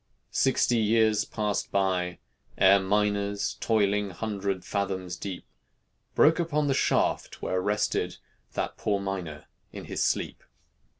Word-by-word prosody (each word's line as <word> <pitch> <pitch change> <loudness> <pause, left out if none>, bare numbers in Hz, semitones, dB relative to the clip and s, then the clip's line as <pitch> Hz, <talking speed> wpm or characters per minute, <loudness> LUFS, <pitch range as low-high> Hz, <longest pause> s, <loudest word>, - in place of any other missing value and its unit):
Sixty 125 -2 +2
years 110 -1 +3
passed 105 -2 -2
by, 90 -2 0 0.4
ere 95 +1 +6
miners 100 +1 0
Toiling, 105 -2 +1
hundred 100 -1 -3
fathoms 95 -3 -2
deep, 95 -1 -6 0.7
Broke 160 +3 +5
upon 150 -3 0
the 140 - +2
shaft - - 0
where 95 0 0
rested 105 +2 0 0.4
That - - -3
poor 100 -2 0
miner 90 -6 -5 0.3
in - - -8
his - - -4
sleep. - - -1
100 Hz, 120 wpm, -27 LUFS, 95-110 Hz, 0.7 s, ere